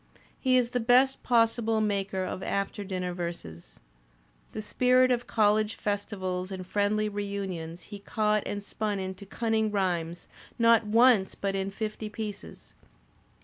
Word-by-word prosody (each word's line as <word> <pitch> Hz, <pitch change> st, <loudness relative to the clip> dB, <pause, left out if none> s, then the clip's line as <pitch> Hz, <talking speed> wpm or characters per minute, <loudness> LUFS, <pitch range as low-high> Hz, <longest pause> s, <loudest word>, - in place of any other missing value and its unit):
He 255 Hz, -1 st, +3 dB
is 245 Hz, -1 st, +1 dB
the 245 Hz, -, 0 dB
best 255 Hz, +3 st, +4 dB
possible 230 Hz, -2 st, +2 dB
maker 200 Hz, -3 st, -1 dB
of 185 Hz, -, -5 dB
after 200 Hz, +1 st, -2 dB
dinner 185 Hz, -2 st, -3 dB
verses. 85 Hz, -, -7 dB, 0.7 s
The 215 Hz, -, -5 dB
spirit 255 Hz, +3 st, +3 dB
of 245 Hz, -1 st, 0 dB
college 215 Hz, 0 st, +2 dB
festivals 190 Hz, -3 st, -3 dB
and 190 Hz, -1 st, -6 dB
friendly 205 Hz, +2 st, +1 dB
reunions 195 Hz, -5 st, -4 dB
he 205 Hz, -1 st, -9 dB
caught 210 Hz, +1 st, 0 dB
and 205 Hz, 0 st, -4 dB
spun 210 Hz, 0 st, -2 dB
into 190 Hz, +1 st, -6 dB
cunning 220 Hz, +1 st, 0 dB
rhymes, 175 Hz, -4 st, -2 dB, 0.3 s
not 230 Hz, -2 st, +4 dB
once 225 Hz, -3 st, +4 dB
but 195 Hz, -1 st, -2 dB
in 195 Hz, 0 st, -1 dB
fifty 215 Hz, +1 st, -5 dB
pieces. 210 Hz, -1 st, -8 dB
205 Hz, 140 wpm, -28 LUFS, 190-225 Hz, 0.7 s, best